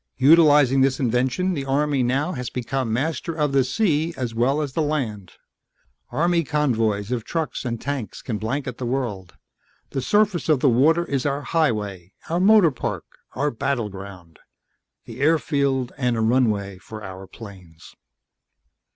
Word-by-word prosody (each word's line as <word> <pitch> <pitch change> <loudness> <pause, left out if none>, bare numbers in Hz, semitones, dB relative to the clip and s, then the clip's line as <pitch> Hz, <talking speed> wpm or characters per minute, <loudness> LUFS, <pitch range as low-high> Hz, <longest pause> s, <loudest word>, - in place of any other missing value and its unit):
"Utilizing 145 -3 +5
this 135 0 +2
invention 130 +8 0
the 140 -5 -3
Army 140 0 +1
now 135 +8 0 0.2
becomes 130 -1 -2
master 155 +6 -2
of 150 -3 0
the 135 -1 +3
sea 160 - 0
as 125 -3 -3
well 125 +6 +1
as 145 -4 -3
the 160 - 0
land. 120 - -3 0.8
Army 170 +6 +1
convoys 115 -8 0
of 120 -3 -1
trucks 160 +5 -3
and 115 -2 -3
tanks 140 -5 -5
can 110 -4 -3
blanket 125 +2 -3
the 125 - -3
world. 115 -9 -3 0.6
The 135 - -2
surface 205 +3 +1
of 150 -4 +4
the 135 - +4
water 155 +8 +3
is 140 -3 -1
our 140 +1 -2
highway, 105 - -1 0.2
our 170 - +1
motor 200 -3 +6
park, 130 - -4 0.3
our 145 +1 0
battleground 100 - -5 0.7
the 120 +3 -9
airfield 140 -4 +1
and 120 -4 +1
runway 105 -6 +1
for 110 +2 -10
our 95 0 -9
planes." 90 -8 -13
130 Hz, 145 wpm, -23 LUFS, 115-150 Hz, 0.8 s, motor